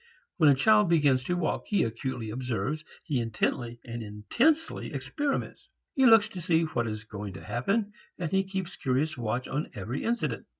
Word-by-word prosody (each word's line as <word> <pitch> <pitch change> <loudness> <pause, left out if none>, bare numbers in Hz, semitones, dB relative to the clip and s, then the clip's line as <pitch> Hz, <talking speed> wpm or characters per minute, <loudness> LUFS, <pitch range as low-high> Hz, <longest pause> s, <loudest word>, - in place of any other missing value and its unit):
When 155 -5 +6
a 140 - +6
child 210 +6 +5
begins 140 -6 +3
to 180 - 0
walk 175 - -1
he 205 - +2
acutely 115 0 -3
observes, 125 +4 -2 0.2
he 145 -7 -1
intently 115 +1 -1
and 120 0 -5
intensely 235 - 0
experiments. 290 -2 -3 0.2
He 265 -2 +5
looks 225 -3 +7
to 180 - -7
see 165 -1 +2
what 120 -7 -1
is 110 0 -4
going 105 -2 -7
to 80 - -9
happen 200 - -1 0.2
and 170 -3 -3
he 195 0 +3
keeps 190 -2 -4
curious 145 +3 0
watch 120 0 -2
on 150 +3 -2
every 110 +7 -4
incident. 235 +1 -1
140 Hz, 175 wpm, -28 LUFS, 115-190 Hz, 0.2 s, looks